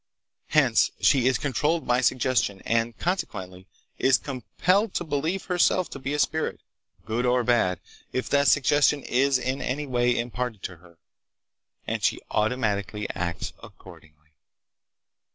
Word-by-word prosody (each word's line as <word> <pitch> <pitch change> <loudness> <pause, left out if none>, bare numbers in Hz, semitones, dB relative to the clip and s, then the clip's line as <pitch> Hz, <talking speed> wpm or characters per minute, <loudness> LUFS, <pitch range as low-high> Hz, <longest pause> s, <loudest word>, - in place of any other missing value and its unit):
Hence - - +3
she 130 -3 +4
is 130 -2 +3
controlled 150 +5 0
by 125 +1 +2
suggestion, 125 -5 +1
and, 115 0 0
consequently, 95 - -4 0.3
is 130 0 +4
compelled 180 - -1
to - - 0
believe 160 +5 -2
herself 180 0 +2
to 140 - -7
be 135 +2 -3
a - - -1
spirit, 155 +2 0 0.5
good 115 +3 -1
or 125 0 +2
bad, 115 -8 +2 0.3
if 130 - -2
that 140 -1 +3
suggestion 145 +1 +3
is 135 +2 +2
in 130 +2 -3
any 145 +3 -2
way 125 -2 +1
imparted 120 -3 -3
to 90 - -6
her, 85 0 -20 0.9
and - - -3
she - - +1
automatically 105 -2 -1
acts 85 -1 -4
accordingly. 75 0 -16
125 Hz, 135 wpm, -25 LUFS, 105-145 Hz, 0.9 s, she